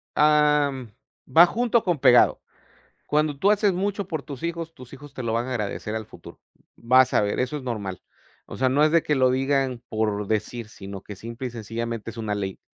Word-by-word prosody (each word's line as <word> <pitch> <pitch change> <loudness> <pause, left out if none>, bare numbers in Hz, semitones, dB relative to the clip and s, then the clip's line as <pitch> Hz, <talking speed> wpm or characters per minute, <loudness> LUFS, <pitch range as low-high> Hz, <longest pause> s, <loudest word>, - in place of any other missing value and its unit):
am, 150 -5 +3 0.4
va 170 +2 +9
junto 235 +2 +1
con 175 -3 0
pegado. 125 -2 +5 0.7
Cuando 150 -1 +1
tú 195 +9 +2
haces 205 -1 +3
mucho 200 +2 -2
por 160 -5 -4
tus 140 +2 -9
hijos, 170 -1 -4
tus 125 -1 -14
hijos 140 +1 -12
te 130 - -6
lo 115 - -1
van 115 +2 -1
a - - -4
agradecer 105 -2 -3
al 110 -1 -5
futuro. - - -13 0.4
Vas 130 +2 +4
a - - +5
ver, 105 -1 -1
eso 130 +4 -1
es 140 - -7
normal. 100 -7 -4 0.5
O - - -9
sea, 130 - +2
no 140 +4 +3
es 155 - +2
de 165 -1 +4
que 150 - 0
lo 130 -1 +4
digan 135 -1 0
por 105 -2 -1
decir, 110 +1 -2
sino 100 -2 -9
que, 105 - -9
simple 115 +5 -6
y - - -10
sencillamente, 115 0 -5
es - - -16
una 110 -2 -3
ley: 95 -2 -4
130 Hz, 210 wpm, -24 LUFS, 110-150 Hz, 0.7 s, va